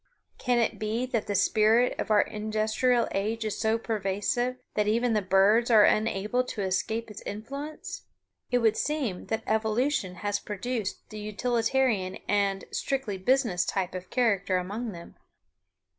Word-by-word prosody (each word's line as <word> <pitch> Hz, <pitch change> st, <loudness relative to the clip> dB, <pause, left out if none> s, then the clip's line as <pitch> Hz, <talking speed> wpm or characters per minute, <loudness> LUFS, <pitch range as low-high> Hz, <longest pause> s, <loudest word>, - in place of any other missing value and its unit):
Can 250 Hz, -2 st, +1 dB
it 235 Hz, -, 0 dB
be 220 Hz, +3 st, -1 dB
that 235 Hz, -4 st, -2 dB
the 205 Hz, -, -1 dB
spirit 220 Hz, +5 st, +4 dB
of -, -, -2 dB
our 210 Hz, -1 st, +5 dB
industrial 215 Hz, +3 st, 0 dB
age 220 Hz, +3 st, -1 dB
is 215 Hz, -, -3 dB
so 220 Hz, +1 st, +2 dB
pervasive 225 Hz, +3 st, -1 dB, 0.2 s
that 210 Hz, -1 st, +1 dB
even 230 Hz, +2 st, +2 dB
the 210 Hz, -, +2 dB
birds 195 Hz, +5 st, +4 dB
are 220 Hz, -3 st, +7 dB
unable 215 Hz, +3 st, +1 dB
to 220 Hz, -5 st, -4 dB
escape 215 Hz, +4 st, -1 dB
its 210 Hz, -, -9 dB
influence? 275 Hz, +9 st, -7 dB, 0.4 s
It 245 Hz, -, +2 dB
would 220 Hz, -1 st, +4 dB
seem 275 Hz, -12 st, -2 dB
that 220 Hz, 0 st, -2 dB
evolution 220 Hz, -2 st, 0 dB
has 205 Hz, 0 st, 0 dB
produced 210 Hz, +1 st, -4 dB
the 215 Hz, -, -7 dB
utilitarian 225 Hz, -2 st, 0 dB
and 200 Hz, -1 st, +1 dB
"strictly 260 Hz, -8 st, -2 dB
business" 225 Hz, -4 st, +2 dB
type 185 Hz, 0 st, -2 dB
of 185 Hz, 0 st, -7 dB
character 200 Hz, -7 st, +1 dB
among 210 Hz, +6 st, -4 dB
them. 170 Hz, -2 st, -11 dB
215 Hz, 150 wpm, -28 LUFS, 200-240 Hz, 0.4 s, are